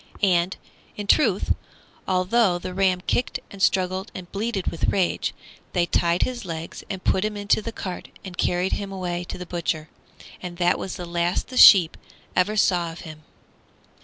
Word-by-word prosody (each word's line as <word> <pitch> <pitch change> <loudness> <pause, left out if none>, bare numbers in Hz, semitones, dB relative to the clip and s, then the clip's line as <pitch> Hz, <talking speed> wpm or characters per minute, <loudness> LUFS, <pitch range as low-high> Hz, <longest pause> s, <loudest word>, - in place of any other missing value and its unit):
And, 180 -1 +2 0.4
in 205 - -4
truth, 205 -3 +3 0.5
although 185 +1 +2
the 180 +1 -6
ram 185 -1 +2
kicked 245 - 0
and 200 - -10
struggled 190 +1 +1
and 180 -2 -8
bleated 205 -2 -2
with 165 - -3
rage, 190 -3 0 0.4
they 175 -2 +2
tied 170 0 +2
his 250 -1 -4
legs 165 -2 -6
and 190 -1 -5
put 190 - +2
him 210 -1 -2
into 205 +1 +2
the 230 - -5
cart 185 -5 -6 0.2
and 185 -2 -8
carried 180 +1 0
him 200 -1 -3
away 180 -2 -3
to - - -6
the 180 - -7
butcher. 170 -3 -3 0.5
And 175 -1 -7
that 175 0 +2
was 190 - -5
the 180 - -6
last 170 +1 -1
the 260 - -8
sheep 180 -9 +8 0.4
ever 210 +4 +2
saw 175 -4 +2
of 165 - -10
him. 155 -2 -10
185 Hz, 175 wpm, -24 LUFS, 175-200 Hz, 0.5 s, sheep